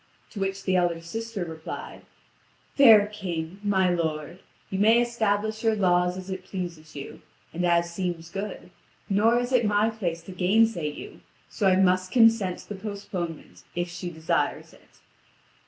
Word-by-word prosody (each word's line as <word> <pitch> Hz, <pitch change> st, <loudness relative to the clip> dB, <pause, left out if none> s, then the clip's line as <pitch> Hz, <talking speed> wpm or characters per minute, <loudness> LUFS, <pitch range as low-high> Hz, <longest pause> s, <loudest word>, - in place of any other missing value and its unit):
To 210 Hz, -, -7 dB
which 195 Hz, 0 st, -2 dB
the 190 Hz, -, +1 dB
elder 175 Hz, -2 st, +1 dB
sister 215 Hz, +3 st, -5 dB
replied: 160 Hz, -1 st, -8 dB, 0.7 s
"Fair 225 Hz, -7 st, +8 dB
King, 185 Hz, -4 st, -5 dB
my 190 Hz, -3 st, +2 dB
lord, 160 Hz, -1 st, -2 dB, 0.3 s
you 190 Hz, -, -2 dB
may 220 Hz, +3 st, +5 dB
establish 220 Hz, -2 st, 0 dB
your 225 Hz, -1 st, +3 dB
laws 180 Hz, -2 st, +2 dB
as 185 Hz, +1 st, -7 dB
it 190 Hz, -1 st, -5 dB
pleases 170 Hz, -5 st, -7 dB
you, 140 Hz, -1 st, -8 dB, 0.3 s
and 175 Hz, +2 st, -2 dB
as 170 Hz, 0 st, +2 dB
seems 170 Hz, -2 st, -4 dB
good, 195 Hz, -2 st, -6 dB, 0.4 s
nor 220 Hz, +4 st, +4 dB
is 245 Hz, +1 st, -3 dB
it 245 Hz, -2 st, +4 dB
my 210 Hz, +1 st, +2 dB
place 175 Hz, -7 st, -3 dB
to 190 Hz, -, -10 dB
gainsay 185 Hz, -2 st, +2 dB
you, 145 Hz, -, -10 dB, 0.3 s
so 200 Hz, -, +1 dB
I 185 Hz, -, +5 dB
must 185 Hz, -1 st, +2 dB
consent 225 Hz, -6 st, +4 dB
to -, -, -19 dB
the 205 Hz, -2 st, -6 dB
postponement, 180 Hz, -, -6 dB
if 175 Hz, 0 st, -2 dB
she 175 Hz, +1 st, -6 dB
desires 160 Hz, -1 st, -2 dB
it." -, -, -23 dB
190 Hz, 160 wpm, -26 LUFS, 175-210 Hz, 0.7 s, Fair